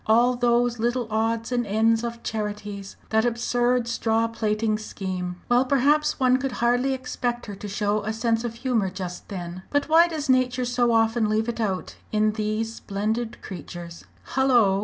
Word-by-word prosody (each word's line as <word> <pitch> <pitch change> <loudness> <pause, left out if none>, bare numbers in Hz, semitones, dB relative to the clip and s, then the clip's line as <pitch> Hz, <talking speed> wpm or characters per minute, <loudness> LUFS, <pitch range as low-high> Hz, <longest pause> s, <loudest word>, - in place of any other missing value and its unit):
All 240 +3 +4
those 240 0 +2
little 240 +1 0
odds 225 +2 0
and 245 -1 +1
ends 225 +2 +2
of 235 0 -5
charities 210 -2 -4 0.2
that 220 0 +3
absurd 240 +1 +1
straw 225 -1 +1
plaiting 215 -1 0
scheme! 185 -4 -5
Well, 245 +1 +4
perhaps 285 +4 +2
one 255 -1 +4
could 265 -1 -3
hardly 245 +3 +2
expect 245 -2 -3
her 205 - -7
to 205 - -7
show 210 +1 0
a 215 +1 -2
sense 225 +1 0
of 235 -1 -4
humour 230 -5 0
just 180 -1 -7
then. 180 -2 -6
But 285 +1 0
why 330 +2 +7
does 310 -3 -4
nature 255 -1 +2
so 245 -1 +2
often 225 -1 +2
leave 220 +1 +1
it 235 0 -3
out 195 -4 -2
in 215 0 +2
these 215 +1 -2
splendid 220 +3 -3
creatures?" 175 -3 -8 0.3
"Hullo!" 240 -7 +4
230 Hz, 170 wpm, -25 LUFS, 210-245 Hz, 0.3 s, why